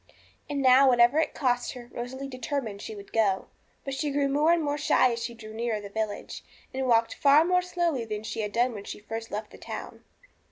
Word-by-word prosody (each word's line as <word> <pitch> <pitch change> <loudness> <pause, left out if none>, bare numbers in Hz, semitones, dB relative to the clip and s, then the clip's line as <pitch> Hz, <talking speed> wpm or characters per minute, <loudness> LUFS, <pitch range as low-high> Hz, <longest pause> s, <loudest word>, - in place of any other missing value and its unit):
And 280 -1 -1
now, 260 +1 +7
whatever 245 +4 +5
it 320 - 0
cost 245 -3 0
her, 245 -2 -10
Rosalie 260 +3 -5
determined 255 -5 -4
she 220 - -7
would 200 -1 -12
go. 200 -4 +1 0.4
But 275 - -3
she 295 +2 -1
grew 280 0 +1
more 295 +4 +3
and 340 -2 +3
more 290 0 -1
shy 255 -3 +4
as 235 - -4
she 235 0 -5
drew 215 -1 -10
nearer 225 -1 -2
the 205 -1 -8
village, 215 -1 -4 0.3
and 265 0 -2
walked 230 -1 +3
far 290 +3 +5
more 360 +1 +3
slowly 345 -7 -1
than 215 -1 -5
she 225 0 -4
had 210 -1 -3
done 240 +2 +1
when 205 -2 -8
she - - -7
first 225 +2 -6
left 210 +1 -5
the - - -13
town. - - -8
245 Hz, 220 wpm, -27 LUFS, 220-280 Hz, 0.4 s, now